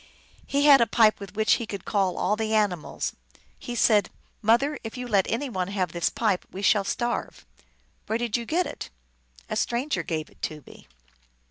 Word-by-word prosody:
He 285 +1 +1
had 280 -3 +8
a 235 - +4
pipe 220 -2 +4
with 200 0 -10
which 220 0 +3
he 230 - -5
could 200 -3 -6
call 195 -3 0
all 210 - +1
the 220 0 -1
ani 210 -3 +3
mals. 155 - -5 0.5
Pie 245 - -5
said, 215 -3 +4 0.2
" - - -40
Mother, 280 +6 +2
if 225 +2 -7
you 250 0 -5
let 200 -5 +2
any 255 +6 -1
one 185 -7 -2
have 190 -4 -2
this 170 -1 0
pipe 210 -5 0
we 195 - -7
shall 205 0 +4
starve." 240 +4 -3 0.3
" - - -40
Where 220 - 0
did 235 -2 -2
you 235 -1 -1
get 350 +3 +1
it? 290 - -7 0.2
" - - -41
" - - -25
A - - 0
stranger 245 +6 -1
gave 155 -2 -4
it - - -25
to 150 -2 -4
me." - - -15
215 Hz, 220 wpm, -26 LUFS, 190-240 Hz, 0.5 s, had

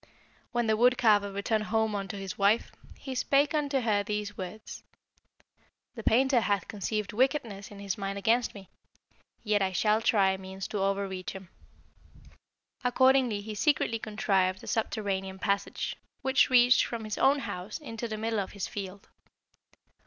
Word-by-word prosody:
"When 240 -1 0
the 220 -1 +2
wood 245 +3 +4
carver 205 -3 +3
returned 215 +2 -1
home 220 -1 +1
unto 200 -1 -4
his 195 -1 -5
wife, 205 +3 +2 0.3
he 265 - -6
spake 275 +3 +2
unto 285 -3 0
her 215 -3 +2
these 210 0 -3
words: 190 +3 -8 1.1
'The 235 - -7
painter 255 +3 +3
hath 205 -4 0
conceived 210 0 -3
wickedness 235 -5 0
in 205 - -12
his 200 -1 -4
mind 195 0 -3
against 230 +4 +1
me; 195 -2 -11 0.8
yet 210 -2 +1
I 190 -1 +1
shall 210 +4 +2
try 195 -4 +3
means 190 0 -7
to 210 - -3
overreach 195 -1 -2
him.' 190 -2 -10 1.3
"Accordingly 255 -3 +3
he 215 +1 -6
secretly 230 -1 +1
contrived 195 -4 0
a - - -10
subterranean 195 -4 -2
passage, 200 +1 -2 0.3
which 265 +1 +3
reached 250 -1 +6
from 230 -2 -4
his 215 -1 -4
own 275 +2 +5
house 195 -6 -5
into 235 -6 -6
the 215 -1 -4
middle 220 0 -1
of 195 - -4
his 200 -2 -4
field. 195 -1 -7
210 Hz, 155 wpm, -29 LUFS, 195-235 Hz, 1.3 s, reached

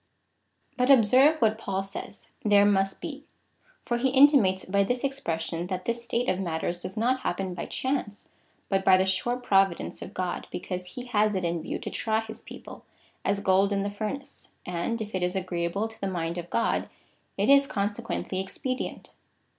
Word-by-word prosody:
But 250 +1 +2
observe 270 +5 +6
what 220 0 +2
Paul 195 -2 -2
says 195 +1 -7
— - - -36
there 205 -1 +5
must 195 -1 +1
he, 290 -1 -6 0.6
for 240 - -1
he 260 +2 +1
inti 285 +3 +7
mates 190 -8 +3
by 200 +1 +2
this 245 +5 -1
expression, 170 -11 -2
that 185 -1 -4
this 235 0 -2
state 235 +1 -1
of 185 0 +1
matters 175 -1 -2
does 190 - -6
not 250 +4 +2
happen 190 -4 -2
by 175 - -5
chance, 260 -6 -3 0.4
but 195 -1 +1
by 190 -1 +6
the 190 - +2
sure 190 +6 +1
providence 195 -7 +1
of 200 - -8
God, 180 -1 -3
be - - -4
cause 180 0 -4
he 250 - -6
has 215 -3 +2
it 185 -2 -1
in 170 -1 -1
view - - -4
to - - -6
try 220 0 0
his 220 0 -8
people, - - -11 0.4
as 200 0 0
gold 195 +1 +3
in 200 -1 +1
the 200 - -2
furnace, 270 +7 -6 0.2
and 180 +7 -2
if 215 - -10
it 185 - -1
is 180 +1 0
agreeable 185 +2 -1
to 225 0 -15
the 195 - -1
mind 170 -2 -2
of 175 0 -8
God, 230 - 0 0.5
it - - +1
is, 280 0 +6
consequently, 205 -4 -2
expedient. 255 +7 -4
200 Hz, 195 wpm, -27 LUFS, 185-240 Hz, 0.6 s, inti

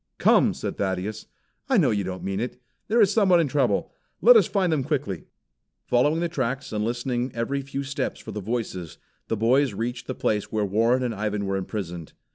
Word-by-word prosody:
"Come!" - - +4
said - - -4
Thaddeus. 100 +2 -2 0.4
"I - - +4
know - - +4
you 100 -2 0
don't 95 0 -5
mean 95 0 -2
it. 125 +2 -4 0.3
There 230 +2 +3
is 205 -1 +4
someone 190 -5 +5
in 165 - +2
trouble. 135 -2 +1 0.3
Let - - +8
us 450 - +6
find 185 -5 +1
them 145 -4 0
quickly." 130 - -3 0.6
Following 145 +7 +2
the 170 - +1
tracks 135 -6 -3
and 105 0 -1
listening 120 +2 -1
every 130 +4 -1
few 140 0 -5
steps 140 +1 -3
for 110 - -8
the 105 0 -5
voices, 100 -6 -4 0.3
the 115 - -1
boys 125 +2 +2
reached 120 +3 -4
the 130 - -3
place 105 -2 -1
where 110 -1 0
Warren 115 +6 +2
and 120 -2 -1
Ivan 105 -1 -2
were 95 0 -1
imprisoned. 90 -4 -5
120 Hz, 200 wpm, -25 LUFS, 105-140 Hz, 0.6 s, Let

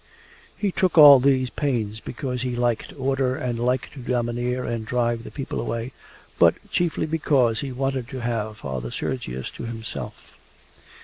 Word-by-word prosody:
He 205 -2 0
took 180 -1 0
all 145 -3 +11
these 130 -1 +2
pains 115 -7 -1
because 125 +1 -4
he 125 -1 -2
liked 120 -2 0
order 135 -1 0
and 120 -2 -3
liked 125 +1 0
to 140 - -10
domineer 120 0 -1
and 115 -1 -2
drive 120 0 0
the - - -8
people 135 - -4
away, 115 +2 -4 0.5
but - - +6 0.2
chiefly 170 -4 0
because 140 -7 +2
he 140 -2 -4
wanted 135 -1 -2
to 130 -1 -6
have 110 -3 -2
Father 65 - -5
Sergius 65 - -4
to - - -7
himself. 115 -1 -7
125 Hz, 160 wpm, -24 LUFS, 115-135 Hz, 0.5 s, all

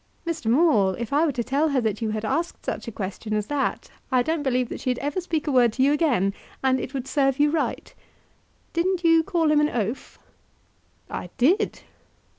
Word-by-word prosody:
"Mr. 330 -7 -3
Maule, 230 - +4
if 235 +2 -5
I 310 +3 +3
were - - +1
to 240 -1 -2
tell 280 +6 +1
her 280 -2 +1
that 220 -1 -2
you 220 - -1
had 215 0 -3
asked 335 +9 -2
such - - -4
a - - -4
question 210 +1 -4
as 210 -1 -1
that 285 +3 -2 0.2
I 255 -1 +3
don't 320 +3 -1
believe 255 -3 0
that - - -6
she'd 250 -1 -1
ever 290 +7 -2
speak 325 -3 -2
a 295 - 0
word 245 -3 +4
to 260 - +1
you 280 +2 +4
again; 245 - +2 0.3
and 260 0 +3
it 260 +2 -6
would 265 -1 -4
serve 270 -2 +1
you 295 0 +4
right. 320 -1 -2 0.8
Didn't 355 +1 0
you 330 -1 +5
call 330 -3 +1
him 300 -1 +4
an 300 - +2
oaf?" 230 0 -3 0.9
"I - - -6
did." 355 - +2
270 Hz, 210 wpm, -24 LUFS, 235-320 Hz, 0.9 s, you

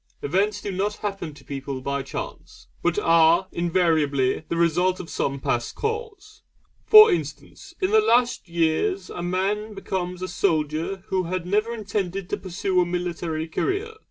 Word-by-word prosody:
Events 200 +7 0
do 200 - -3
not 200 +3 -1
happen 195 -6 -3
to - - -15
people 140 -1 -5
by 140 +1 -2
chance, - - -8 0.2
but 175 +1 0
are 165 -1 +4
invariably 160 -6 +1
the 170 - -1
result 175 +2 +2
of 170 - -8
some 140 0 -2
past 120 -2 -2
cause. 435 -1 -5 0.5
For 430 0 +10
instance, 355 - -5
in 380 +1 0
the 435 0 +6
last 245 - +2
years 170 - 0
a - - -5
man 200 +4 -1
becomes 180 -2 -4
a - - -2
soldier 165 +1 -1
who 185 -1 0
had 180 0 -3
never 210 +5 +1
intended 195 -4 -3
to - - 0
pursue 185 0 0
a - - +2
military 170 -2 -3
career. 400 - -2
185 Hz, 155 wpm, -24 LUFS, 165-210 Hz, 0.5 s, For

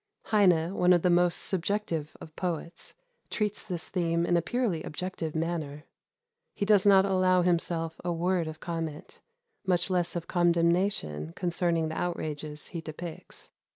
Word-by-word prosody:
Heine, 180 -5 +3
one 180 -2 +4
of 175 - +2
the 180 - +4
most 175 0 +4
subjective 180 -4 -2
of 155 - -12
poets, 170 -1 -4 0.3
treats 210 -1 -1
this 180 -5 -4
theme 170 -2 0
in 175 - +2
a 170 - +3
purely 205 -3 -1
objective 165 -1 -5
manner. 160 -3 -3 0.7
He 200 - -1
does 205 -1 +4
not 195 -1 +7
allow 185 -2 +3
himself 165 -2 0
a 175 - -1
word 175 0 0
of 155 0 -7
comment, 165 -3 -5 0.4
much 185 -1 +1
less 180 -1 +1
of 170 -1 -3
condemnation 170 - +1
concerning 170 -2 0
the 160 - -3
outrages 155 -3 -4
he 170 - -5
depicts. 160 +1 -8
175 Hz, 150 wpm, -29 LUFS, 160-185 Hz, 0.7 s, not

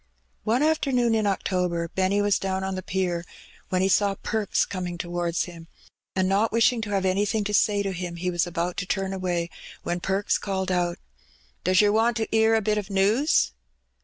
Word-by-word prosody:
One 235 +6 +2
afternoon 270 -7 +2
in 215 -2 +2
October 180 -3 0
Benny 190 +4 +1
was 205 -1 +2
down 190 0 -2
on 190 0 -2
the 185 - -3
pier, 180 -2 -1 0.5
when 185 0 +1
he - - +3
saw 195 +2 +3
Perks 215 0 0
coming 180 -2 -4
towards 175 0 -1
him, 165 -2 -10 0.5
and 185 0 +2
not 200 +4 +2
wishing 230 +1 +3
to 215 - -4
have 195 -2 0
anything 205 +3 +1
to 210 +1 -3
say 205 0 +3
to 195 - -2
him, 180 -1 -5
he 180 +1 -2
was 175 0 0
about 175 +1 -2
to 180 - -3
turn 195 -1 -1
away, 175 -3 -2 0.3
when 175 - -2
Perks 195 +3 0
called 190 -2 -2
out 175 -1 0 0.4
— 60 -2 -34
"Does 185 +2 +4
yer 205 -1 +4
want 225 +2 +2
to 225 - 0
^ear 220 0 +4
a 220 - -1
bit 210 0 +1
o^ 200 -1 -7
news? 205 - +3
190 Hz, 200 wpm, -25 LUFS, 180-210 Hz, 0.5 s, Does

